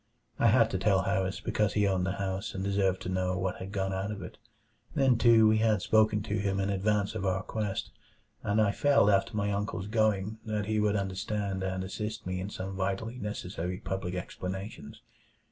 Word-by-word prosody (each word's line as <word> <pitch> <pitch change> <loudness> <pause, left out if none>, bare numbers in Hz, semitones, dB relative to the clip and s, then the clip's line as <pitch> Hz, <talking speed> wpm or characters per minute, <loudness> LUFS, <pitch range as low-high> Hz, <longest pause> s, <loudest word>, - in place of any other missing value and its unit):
I - - +5
had - - +5
to - - -1
tell - - +3
Harris 95 0 -1
because 105 -2 0
he 105 -1 +2
owned 95 -1 +1
the 95 - 0
house 95 -1 -3
and 95 - -3
deserved 95 -1 +1
to - - -4
know 90 0 0
what 95 -1 -2
had 95 +1 -7
gone 95 -1 -1
out 95 +2 -2
of 100 -3 -5
it. 90 - -10 0.6
Then 135 -4 +4
too, 115 -2 +6
we 110 0 +4
had 110 -3 +2
spoken 110 -1 +3
to 105 0 -2
him 100 0 0
in 100 +1 0
advance 100 +1 +1
of - - -4
our 95 0 0
quest; 105 -2 -3 0.5
and 110 -3 +1
I 105 -2 +4
felt 140 -3 +4
after 100 +2 +1
my 100 0 0
uncle's 100 -1 -2
going 110 -1 +1
that 105 -2 -2
he 110 0 0
would 105 0 +2
understand 100 0 -2
and 95 0 -2
assist 105 +3 -5
me 90 0 -2
in 95 +2 -4
some 95 -1 -5
vitally 100 +6 -2
necessary 90 -4 -4
public 95 -1 -4
explanations. 95 +2 -6
100 Hz, 200 wpm, -30 LUFS, 95-105 Hz, 0.6 s, too